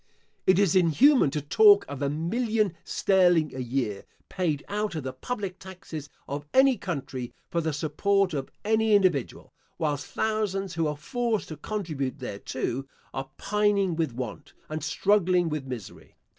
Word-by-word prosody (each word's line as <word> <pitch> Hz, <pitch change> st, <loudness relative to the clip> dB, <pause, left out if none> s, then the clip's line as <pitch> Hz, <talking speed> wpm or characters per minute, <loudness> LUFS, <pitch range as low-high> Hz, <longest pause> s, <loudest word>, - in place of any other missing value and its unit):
It 185 Hz, -, +6 dB
is 195 Hz, -4 st, +3 dB
inhuman 185 Hz, -, +5 dB
to 150 Hz, +2 st, -2 dB
talk 205 Hz, +5 st, +6 dB
of 140 Hz, -1 st, -7 dB
a 140 Hz, -, +1 dB
million 210 Hz, -, 0 dB
sterling 175 Hz, -5 st, +3 dB
a 130 Hz, -, -6 dB
year, 120 Hz, -5 st, -2 dB, 0.3 s
paid 160 Hz, -6 st, -1 dB
out 210 Hz, -2 st, -2 dB
of 155 Hz, -, -3 dB
the 130 Hz, 0 st, -4 dB
public 195 Hz, -, -5 dB
taxes 170 Hz, -6 st, -8 dB, 0.2 s
of 145 Hz, +1 st, -4 dB
any 265 Hz, 0 st, +6 dB
country, 135 Hz, -, -5 dB, 0.2 s
for 170 Hz, -, +1 dB
the 160 Hz, 0 st, -1 dB
support 185 Hz, +6 st, +1 dB
of 135 Hz, -2 st, -3 dB, 0.2 s
any 220 Hz, 0 st, +3 dB
individual, 180 Hz, -, +1 dB, 0.2 s
whilst 150 Hz, -3 st, -1 dB
thousands 200 Hz, -4 st, -1 dB
who 165 Hz, -1 st, 0 dB
are 150 Hz, -1 st, -3 dB
forced 235 Hz, -, -2 dB
to 155 Hz, -, -5 dB
contribute 150 Hz, -8 st, -3 dB
thereto, 125 Hz, +2 st, -4 dB, 0.3 s
are 135 Hz, 0 st, -4 dB
pining 200 Hz, -3 st, +1 dB
with 160 Hz, -4 st, 0 dB
want, 130 Hz, +4 st, -6 dB, 0.2 s
and 155 Hz, -1 st, -4 dB
struggling 180 Hz, +2 st, +2 dB
with 150 Hz, -3 st, -4 dB
misery. 125 Hz, -6 st, -8 dB
170 Hz, 155 wpm, -27 LUFS, 145-205 Hz, 0.3 s, It